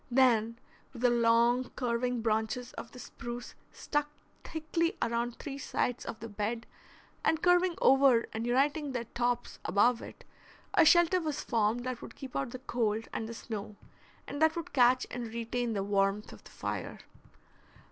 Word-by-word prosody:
Then, 235 -3 +3 0.4
with 245 -1 -8
the 245 - +5
long, 235 +1 +3
curving 245 -1 -1
branches 220 +3 -1
of - - -8
the - - -12
spruce 240 0 -7 0.2
stuck 295 -1 -2 0.3
thickly 330 +3 -1
around 235 +1 -1
three 280 -1 -6
sides 245 -2 -1
of 225 - -5
the 230 - -5
bed, 220 +2 -3 0.6
and 320 - +1
curving 355 0 +4
over 265 -3 +5
and 225 +2 -3
uniting 280 +3 +1
their 240 -2 -2
tops 240 +1 -2
above 230 +5 +3
it, - - -10 0.5
a - - +6
shelter 345 +2 +5
was 305 -2 -3
formed 230 0 +1
that 255 -1 -4
would - - -10
keep 265 -2 -9
out 275 - -1
the 255 - -6
cold 225 -4 -1
and 220 - -3
the 230 - -6
snow, 215 -2 -6 0.5
and 285 - -6
that 315 0 +4
would 335 -2 -5
catch 255 -1 +4
and 245 -1 -4
retain 235 +1 -2
the 200 -2 -1
warmth 200 +1 0
of - - -14
the - - -12
fire. - - -5
240 Hz, 165 wpm, -31 LUFS, 230-270 Hz, 0.6 s, a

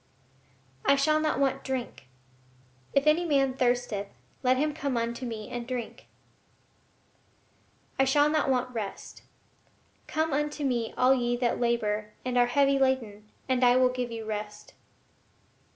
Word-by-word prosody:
I 275 - +4
shall 305 +3 +2
not 310 -3 0
want 275 -1 0
drink. 260 - -5 0.8
"If 275 +1 +2
any 305 +3 +4
man 275 -5 +2
thirsteth 245 -5 0 0.3
let 255 0 +3
him 300 +2 0
come 280 -4 -2
unto 235 +2 -3
me 220 -2 -6
and 240 -1 -5
drink." 245 -3 -6 1.9
I 270 - +5
shall 290 +2 +4
not 305 -2 +1
want 255 -1 0
rest. 215 -4 -6 0.9
"Come 315 -1 -1
unto 295 +1 -1
Me 240 -4 -1
all 255 +1 +5
ye 240 -2 0
that 240 -1 0
labor 215 -3 -1
and 250 -1 -2
are 245 0 +4
heavy 275 +2 +3
laden, 225 -6 -1 0.2
and 260 -1 +1
I 245 0 +6
will 255 0 +4
give 250 -1 -3
you 225 -1 -6
rest." 210 -1 -6
255 Hz, 145 wpm, -28 LUFS, 235-275 Hz, 1.9 s, I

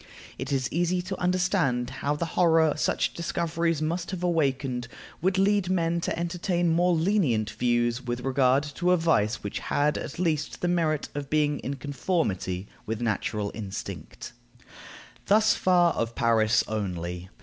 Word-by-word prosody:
It - - -4
is 135 -1 +1
easy 175 +2 +1
to 185 +1 -5
understand 180 -9 +1
how 145 +1 0
the 170 - -2
horror 160 -3 +4
such 155 - 0
discoveries 165 -1 -1
must 170 +3 -2
have 185 -2 -5
awakened 135 -7 0 0.3
would 185 +2 +1
lead 195 -1 +2
men 170 -2 +1
to - - -2
entertain 175 0 0
more 175 +2 +3
lenient 160 - +1
views 120 0 +1
with 120 0 -4
regard 135 +1 +3
to 180 +3 +2
a - - +4
vice 125 -10 +1
which 100 - -4
had 150 +1 0
at - - -7
least 160 -4 -1
the 175 - +1
merit 165 -4 0
of 145 -2 -5
being 150 -1 +1
in 140 - -4
conformity 125 - -2 0.2
with 110 0 -2
natural 105 -2 -1
instinct. 100 -3 -7 0.9
Thus 215 +1 +5
far 175 -2 +3
of 115 0 -2
Paris 115 -3 +3
only. 90 -4 -4
155 Hz, 150 wpm, -27 LUFS, 120-175 Hz, 0.9 s, Thus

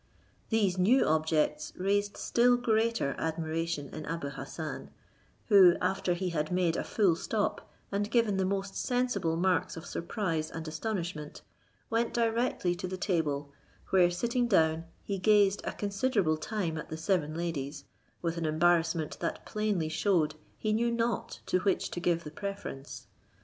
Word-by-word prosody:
These 200 -5 +2
new 235 +9 +5
objects 155 -1 +1
raised 205 +2 0
still 245 +1 +3
greater 225 - +1
admiration 160 -2 -2
in 155 -1 -7
Abou 165 -3 -3
Hassan; 140 - -6 0.6
who, 190 -5 +7
after 190 -2 0
he 185 +1 -2
had 155 -2 -2
made 180 -2 +2
a - - -1
full 195 -6 +2
stop, 205 +5 -2 0.2
and 205 +1 -1
given 230 -4 +2
the 190 - +1
most 195 0 -2
sensible 245 -10 0
marks 185 0 +1
of 165 - -8
surprise 165 -4 -2
and 160 0 -6
astonishment, 165 -3 -4 0.5
went 230 +1 0
directly 230 -5 +1
to 185 - -4
the 185 +1 -4
table, 150 -7 -1 0.4
where 180 -2 +5
sitting 235 +7 0
down, 160 -5 +3 0.2
he 195 -1 -3
gazed 205 0 +4
a - - -1
considerable 200 -5 0
time 165 -2 -2
at - - -8
the 160 - -5
seven 160 -3 0
ladies, 160 -5 -4 0.4
with 170 0 -1
an 165 - -2
embarrassment 165 0 +2
that - - -3
plainly 210 -6 -1
shewed 160 -2 +1 0.2
he 215 -1 0
knew 235 +2 +2
not 235 -2 -1
to 185 - +1
which 195 0 0
to - - -3
give 170 -1 +1
the 150 - -8
preference. 195 -7 -6
180 Hz, 155 wpm, -30 LUFS, 160-210 Hz, 0.6 s, who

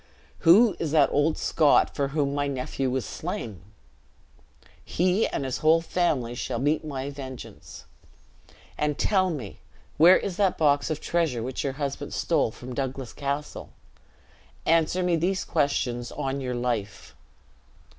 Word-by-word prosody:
Who 200 +6 +6
is 165 - -1
that 150 -3 +4
old 145 +2 +2
Scot, 155 -3 +3
for 140 - 0
whom 140 0 -1
my 145 0 -1
nephew 135 0 -2
was 130 -3 -2
slain? 100 -2 -5 1.2
He 185 +5 +1
and 135 - -3
his 130 0 -3
whole 160 +1 +4
family 160 -8 0
shall 120 0 -3
meet 145 +6 0
my 140 -2 -4
vengeance! 130 - -10 0.9
And 150 -1 0
tell 190 -3 +2
me 130 - -6 0.4
where 175 +4 +8
is 190 -3 -4
that 195 -3 +2
box 145 -2 +2
of 155 -1 -3
treasure 160 -9 0
which 130 +1 -4
your 135 - -2
husband 140 0 -4
stole 160 -8 +1
from 125 +3 -9
Douglas 135 -1 -4
Castle? 140 +1 -4 0.9
Answer 165 +3 +2
me 175 -2 +2
these 185 +4 -1
questions 125 -6 -1
on 135 +1 -3
your 125 -1 -3
life." 115 -5 -3
145 Hz, 145 wpm, -26 LUFS, 130-165 Hz, 1.2 s, where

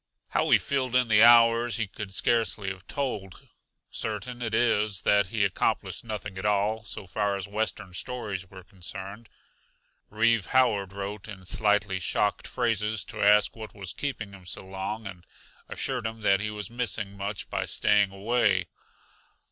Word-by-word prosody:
How - - +1
he - - +7
filled 130 -3 -1
in 125 -2 +3
the 105 -1 +6
hours 115 0 +6
he 110 - 0
could 100 0 -8
scarcely 110 -1 0
have 95 +1 -8
told; 105 -10 -4 0.4
certain 115 +3 -3
it 110 -2 -1
is 110 -4 +2
that 100 -2 +4
he 105 +1 +1
accomplished 100 - -1
nothing 105 -4 -5
at - - -6
all 105 +2 +1
so 105 - -4
far 100 +2 -1
as 100 -1 -4
Western 105 -2 -3
stories 100 -3 -4
were 95 -1 -12
concerned. 95 +3 -8 0.8
Reeve 115 -1 +2
Howard 110 -7 +2
wrote 100 +1 -5
in 95 -4 -10
slightly 105 -1 +1
shocked 105 +3 0
phrases 110 -4 0
to 105 0 -7
ask 105 +1 +5
what 110 -2 -9
was 95 -4 -6
keeping 115 -8 -4
him 95 -2 -13
so 95 - -6
long; 95 +3 -5
and 95 -3 -8 0.5
assured 125 -4 -1
him 110 0 -7
that 100 -2 +4
he 110 +1 -2
was 105 -1 -6
missing 110 -4 -2
much 100 +1 -4
by - - -1
staying 100 -2 +3
away. 115 +5 +2
105 Hz, 165 wpm, -27 LUFS, 100-115 Hz, 0.8 s, he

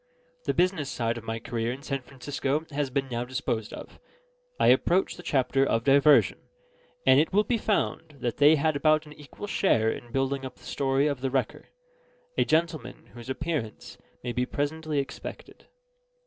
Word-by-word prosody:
The - - +1
business 175 -5 +1
side 115 -1 -1
of - - -14
my 115 0 -3
career 115 0 -2
in 135 +3 -7
San 135 -2 -3
Francisco 140 +3 -3
has 145 -1 -1
been 135 +1 -1
now 120 -1 -2
disposed 120 -3 -3
of; - - -10 0.6
I - - +5
approach 185 +2 +3
the - - -10
chapter 135 0 +1
of 115 -4 +1
diversion; 140 +2 +5 0.7
and 130 +1 +7
it 155 - +2
will 205 +2 +4
be 230 +2 0
found 165 -7 -1
they 145 +5 +4
had 155 +1 +1
about 155 +1 +3
an 150 - -11
equal 150 +6 -10
share 115 - +2
in 120 +1 -8
building 135 +1 -1
up 130 -1 -7
the - - -21
story 135 0 +1
of 140 -4 -1
the 135 - 0
Wrecker 130 -4 -2 0.7
a - - +2
gentleman 160 0 -1
whose 120 +1 -10
appearance 140 -6 -4 0.2
may 120 - -2
be 125 +1 -1
presently 155 +2 -2
expected. 140 -1 -6
140 Hz, 175 wpm, -27 LUFS, 125-155 Hz, 0.7 s, and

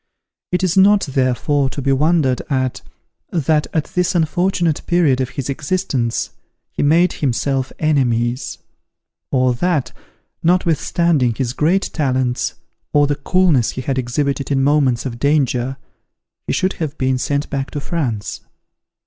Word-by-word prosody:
It 180 +1 0
is 180 -2 +1
not, 200 +1 +5
therefore, 135 +1 0
to 135 - -6
be 135 0 0
wondered 145 -2 +2
at, 130 -2 -1 0.5
that 155 -3 +1
at 160 - 0
this 180 0 +1
unfortunate 175 0 +1
period 155 -7 +3
of 130 - -2
his 130 -1 -5
existence, 140 -4 -1 0.4
he - - -3
made 165 +5 +3
himself 135 0 -1
enemies; 125 -5 0 0.7
or 130 -1 +2
that, 150 +2 0 0.5
notwithstanding 165 -6 +2
his 125 -1 -2
great 170 +8 +1
talents, 130 -5 0 0.4
or 145 0 +4
the 145 0 0
coolness 155 -4 +2
he 130 - -4
had 130 0 -1
exhibited 140 +2 -1
in 135 -1 +1
moments 140 -4 +2
of 120 -3 -5
danger, 135 -3 +1 0.7
he - - -1
should 185 +1 0
have 155 -1 -3
been 130 -1 0
sent 140 +2 -1
back 135 -1 -2
to 145 - -4
France. 135 -10 -3
140 Hz, 140 wpm, -19 LUFS, 130-165 Hz, 0.7 s, not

